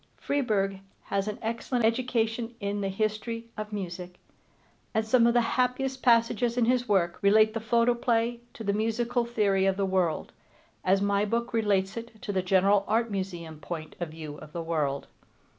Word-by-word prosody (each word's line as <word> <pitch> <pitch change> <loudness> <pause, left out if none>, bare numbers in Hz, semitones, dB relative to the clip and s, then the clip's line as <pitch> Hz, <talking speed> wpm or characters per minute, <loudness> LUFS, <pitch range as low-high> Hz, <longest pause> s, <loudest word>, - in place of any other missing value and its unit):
Freeburg 205 -9 0 0.2
has 200 0 -1
an 210 - -3
excellent 230 +1 -1
education 230 -1 0
in 200 -1 -2
the 195 - -1
history 215 +3 -2
of 215 0 -5
music, 180 -3 -5 0.8
and 220 0 +2
some 235 +1 +4
of 235 - +2
the 240 - +6 0.2
happiest 260 +1 -1
passages 235 0 +3
in 240 - +4
his 245 -1 +1
work 175 -4 +2
relate 215 +2 +5
the 225 - -2
photoplay 235 +1 +1 0.2
to 225 - -7
the 200 -1 0
musical 230 +3 0
theory 200 -5 +2
of 195 0 +1
the 200 - +1
world, 185 -4 0 0.5
as 195 +2 +3
my 200 0 +2
book 235 +3 -1
relates 200 -3 +1
it 230 -1 -8
to 205 - -2
the 190 - +1
general 195 +2 +3
Art 230 +1 +1
Museum 175 -5 -4
point 155 +1 -6
of 175 -2 -3
view 155 -2 -8
of 155 0 -12
the 170 - -3
world. 150 -4 -1
215 Hz, 175 wpm, -28 LUFS, 190-235 Hz, 0.8 s, the